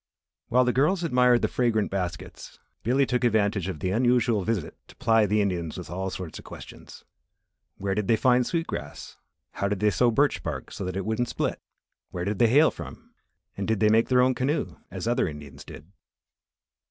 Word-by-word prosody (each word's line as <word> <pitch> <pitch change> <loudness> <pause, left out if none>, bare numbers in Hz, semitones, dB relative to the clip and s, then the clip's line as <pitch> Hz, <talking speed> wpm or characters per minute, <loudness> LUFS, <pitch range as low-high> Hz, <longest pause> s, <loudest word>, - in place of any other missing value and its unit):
While 125 +1 +3
the 125 - +1
girls 175 +7 +2
admired 125 -5 +3
the - - +3
fragrant 115 -4 0
baskets, 90 -3 -5 0.2
Billy 130 +5 +2
took 125 0 -1
advantage 105 -5 +1
of 80 -6 -5
the 90 - -1
unusual 120 -2 +2
visit 110 -4 -2
to - - -16
ply 115 -2 +3
the 105 +2 +2
Indians 85 -5 -3
with - - -8
all 95 +2 -3
sorts 90 -4 -7
of - - -12
questions. - - -12 0.7
Where 95 0 -2
did 105 0 -2
they 115 - +4
find 125 +2 +3
sweet 165 +6 -2
grass; 70 - -7 0.3
how 100 - -2
they 105 +1 +1
sewed 120 +1 +2
birch 145 +1 +2
bark - - -5
so 100 - -6
that 90 +1 -4
it 95 - -3
wouldn't 110 +2 -1
split; - - -2 0.5
where 90 -1 -4
did 100 0 -2
they 120 - +5
hail 150 +6 +5
from, - - -11 0.4
and 100 - -4
did 110 -2 0
they 105 - +4
make 115 +1 +3
their 125 -1 +4
own 130 0 +3
canoe, 135 +5 -2
as - - -5
other - - +1
Indians 75 -2 -9
did. 80 +6 -12
110 Hz, 195 wpm, -26 LUFS, 95-125 Hz, 0.7 s, they